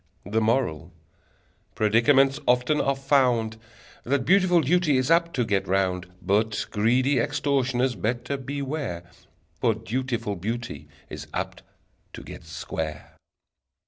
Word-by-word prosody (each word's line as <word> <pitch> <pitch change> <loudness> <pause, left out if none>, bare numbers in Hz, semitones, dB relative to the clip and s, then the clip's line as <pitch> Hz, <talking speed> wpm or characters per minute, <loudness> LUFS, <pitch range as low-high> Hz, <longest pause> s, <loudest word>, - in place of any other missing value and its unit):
The 110 +2 0
Moral: 110 - 0 0.8
Predicaments 135 +6 +4
often 125 +5 +3
are 140 0 +1
found 125 -5 +2 0.5
That 130 0 0
beautiful 180 -1 +4
duty 155 -1 +2
is 130 +5 0
apt 170 0 +3
to 125 -3 +1
get 100 -3 0
round: 95 -1 0 0.2
But 110 +2 +1
greedy 125 +6 +2
extortioners 130 -1 0
better 120 +4 -2
beware 135 - -4 0.6
For 115 - +2
dutiful 115 -2 -3
beauty 115 - -5 0.2
is - - -7
apt - - -4 0.5
to - - -9
get - - -10
square! 80 -1 -5
125 Hz, 115 wpm, -25 LUFS, 110-140 Hz, 0.8 s, Predicaments